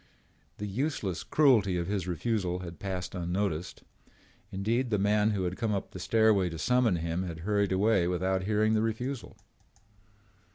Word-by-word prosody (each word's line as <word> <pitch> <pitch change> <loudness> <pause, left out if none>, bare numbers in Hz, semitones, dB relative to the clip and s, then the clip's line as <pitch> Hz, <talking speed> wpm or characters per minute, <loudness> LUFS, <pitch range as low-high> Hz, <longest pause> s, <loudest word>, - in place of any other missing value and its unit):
The 105 - -4
useless 105 - -2
cruelty 115 -11 +3
of 85 - -1
his 95 -1 -2
refusal 90 0 -1
had 85 -2 -8
passed 95 -2 -4
unnoticed. 90 -1 -2 0.7
Indeed, 115 +6 0
the 105 - +1
man 105 +2 +2
who 100 -3 -1
had 90 +1 -2
come 110 -3 0
up 100 - -4
the 95 - -8
stairway 110 -2 +3
to 85 - -6
summon 125 +2 +2
him 85 +1 -2
had 85 -4 -5
hurried 100 +1 +1
away 95 -1 +3
without 95 +1 0
hearing 110 +1 +2
the 110 - +2
refusal. 115 +3 -3
100 Hz, 160 wpm, -29 LUFS, 90-110 Hz, 0.7 s, cruelty